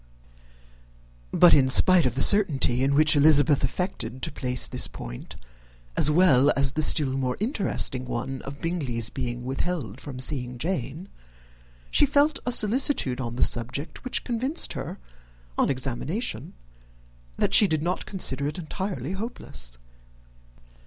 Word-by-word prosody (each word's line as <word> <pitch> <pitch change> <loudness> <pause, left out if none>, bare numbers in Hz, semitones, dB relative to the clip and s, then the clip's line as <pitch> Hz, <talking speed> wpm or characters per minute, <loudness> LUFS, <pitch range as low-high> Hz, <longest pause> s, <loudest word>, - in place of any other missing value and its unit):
But, 175 - +5
in 130 -2 +3
spite 175 +2 +5
of 125 - -4
the 135 - +4
certainty 140 -11 +3
in 140 +1 +1
which 155 +1 +4
Elizabeth 145 -1 +4
affected 130 - -4
to - - 0
place 125 -3 -2
this - - -1
point, - - -10 0.6
as 150 - +2
well 150 -4 +4
as 140 -1 +3
the 155 - -3
still 145 -2 +4
more 130 -2 -3
interesting 200 - -1
one 125 +2 -5
of 140 +1 -9
Bingley's 130 -10 -2
being 120 -2 -5
withheld 135 - -4
from 135 -3 -9
seeing 125 -2 -4
Jane, 160 +2 -5 0.8
she 290 - +4
felt 285 +2 +1
a - - 0
solicitude 215 - +1
on 120 -1 -5
the - - +1
subject 125 +6 +1
which 255 - -2
convinced 260 +7 -1
her, 165 +9 -7 0.6
on - - 0
examination, 135 - -4 0.8
that - - -1
she 210 - +8
did 155 -3 -2
not 180 +2 -3
consider 140 -8 0
it 150 - -4
entirely 175 - -5
hopeless. 190 - -7
145 Hz, 140 wpm, -24 LUFS, 125-185 Hz, 0.8 s, she